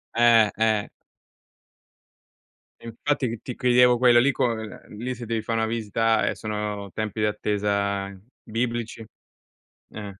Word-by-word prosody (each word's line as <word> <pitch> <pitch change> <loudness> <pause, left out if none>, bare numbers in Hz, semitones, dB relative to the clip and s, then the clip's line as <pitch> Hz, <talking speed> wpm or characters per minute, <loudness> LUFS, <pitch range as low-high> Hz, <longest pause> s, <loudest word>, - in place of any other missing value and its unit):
Eh, 115 -2 +5
eh. 110 -2 +1 1.9
E - - -14
infatti 135 +4 -1
ti 115 -2 -5
ti 125 - -7
chiedevo 125 0 +4
quella 120 -1 +6
lì 135 +4 +4
co 125 -2 +1
ehm, 110 -2 -8
lì 125 +3 -4
se 120 - -8
devi 115 0 -2
fa 110 +1 -3
una 115 0 +1
visita, 115 0 0
ehm, - - 0
sono 105 -2 -4
tempi 110 +1 -4
d'attesa 100 -2 -1 0.3
biblici? 115 0 -3 0.9
Eh, 105 -1 -7
110 Hz, 135 wpm, -24 LUFS, 105-120 Hz, 1.9 s, quella